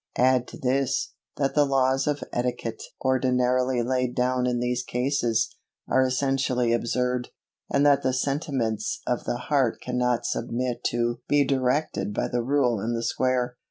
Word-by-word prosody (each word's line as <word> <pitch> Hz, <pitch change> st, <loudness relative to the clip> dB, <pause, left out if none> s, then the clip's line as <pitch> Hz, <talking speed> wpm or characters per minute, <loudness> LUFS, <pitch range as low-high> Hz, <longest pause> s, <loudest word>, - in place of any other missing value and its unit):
Add 125 Hz, 0 st, +3 dB
to -, -, -10 dB
this, 135 Hz, +1 st, 0 dB, 0.2 s
that 135 Hz, -1 st, 0 dB
the 150 Hz, -, +4 dB
laws 135 Hz, -1 st, +2 dB
of 145 Hz, -1 st, 0 dB
etiquette 120 Hz, -2 st, -2 dB, 0.2 s
ordinarily 125 Hz, -1 st, +2 dB
laid 125 Hz, 0 st, -1 dB
down 125 Hz, 0 st, +1 dB
in 120 Hz, -1 st, 0 dB
these 125 Hz, 0 st, 0 dB
cases, 125 Hz, -3 st, 0 dB, 0.3 s
are 130 Hz, -, +3 dB
essentially 130 Hz, -2 st, +1 dB
absurd, 125 Hz, +1 st, -1 dB, 0.4 s
and 140 Hz, +1 st, +3 dB
that 145 Hz, -1 st, +5 dB
the 130 Hz, -, +1 dB
sentiments 130 Hz, -5 st, -1 dB
of 125 Hz, -, -1 dB
the 120 Hz, -, -1 dB
heart 130 Hz, -2 st, +1 dB
cannot 125 Hz, -1 st, 0 dB
submit 120 Hz, +1 st, -2 dB
to 120 Hz, 0 st, 0 dB
be 145 Hz, -1 st, +4 dB
directed 130 Hz, -5 st, 0 dB
by -, -, -1 dB
the 120 Hz, -, 0 dB
rule 125 Hz, -3 st, +1 dB
and 115 Hz, +4 st, -2 dB
the 115 Hz, -, -3 dB
square. 125 Hz, 0 st, 0 dB
125 Hz, 155 wpm, -26 LUFS, 120-130 Hz, 0.4 s, that